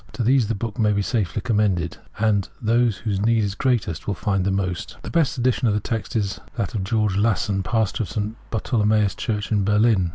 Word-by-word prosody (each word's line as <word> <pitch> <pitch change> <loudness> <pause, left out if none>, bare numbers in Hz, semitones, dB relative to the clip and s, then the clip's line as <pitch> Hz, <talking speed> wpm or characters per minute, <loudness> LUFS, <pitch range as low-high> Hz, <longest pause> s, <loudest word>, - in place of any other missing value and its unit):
To 120 - -2
these 125 -1 +3
the 115 - -1
book 110 +1 -5
may 105 -1 +3
be 100 0 +1
safely 100 0 -1
commended, 100 -7 +1 0.2
and 105 -3 +1
those 115 -2 +2
whose 100 -4 -2
need 115 +1 +3
is 100 -2 -1
greatest 110 -8 -1
will 100 - 0
find 100 +1 0
the - - +2
most. 95 -3 -2
'The - - -6
best 160 -3 +1
edition 125 0 +1
of 105 - +2
the - - +2
text 110 +2 -4
is 100 -3 -1 0.2
that 115 -6 -2
of 105 -4 -2
Georg 105 +1 +1
Lasson, 100 -1 +1
Pastor 110 +2 0
of 100 - -3
St. 105 +2 -3
Bartolemaus 105 -3 +1
Church 105 -2 -3
in 105 -2 +2
Berlin. 105 -2 +3
105 Hz, 215 wpm, -23 LUFS, 100-115 Hz, 0.2 s, these